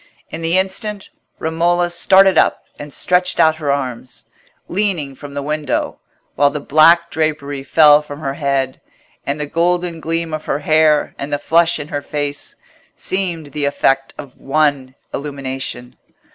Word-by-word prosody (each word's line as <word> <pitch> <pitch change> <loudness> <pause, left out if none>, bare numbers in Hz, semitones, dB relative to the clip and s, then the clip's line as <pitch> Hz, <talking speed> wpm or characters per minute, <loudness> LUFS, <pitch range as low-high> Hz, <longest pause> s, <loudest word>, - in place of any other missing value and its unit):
In 165 - -6
the 165 +2 +1
instant, 195 +2 -3 0.3
Romola 175 +2 0
started 190 +2 +5
up - - +2 0.2
and 145 0 -8
stretched 180 +4 0
out 160 -1 +4
her 150 -3 -1
arms, 130 -3 -4 0.4
leaning 180 -8 -1
from 140 +1 -11
the 140 - -3
window, 150 +1 -2 0.3
while 145 - +3
the 150 - -4
black 165 +4 +4
drapery 150 -3 -2
fell 150 +1 +6
from 145 -1 -9
her 135 -3 -3
head, 140 -3 -2 0.5
and 140 +2 -2
the 150 - -2
golden 175 +2 0
gleam 165 0 -2
of 155 0 -4
her - - -1
hair 155 0 +2
and 140 +1 -5
the 145 - +1
flush 170 +3 +2
in 150 0 -7
her 145 - -3
face 145 0 -4 0.4
seemed 170 -6 -3
the 145 +1 -2
effect 135 -1 0
of 140 -3 -11
one 135 -2 0 0.2
illumination. 135 -3 -5
150 Hz, 155 wpm, -18 LUFS, 140-170 Hz, 0.5 s, fell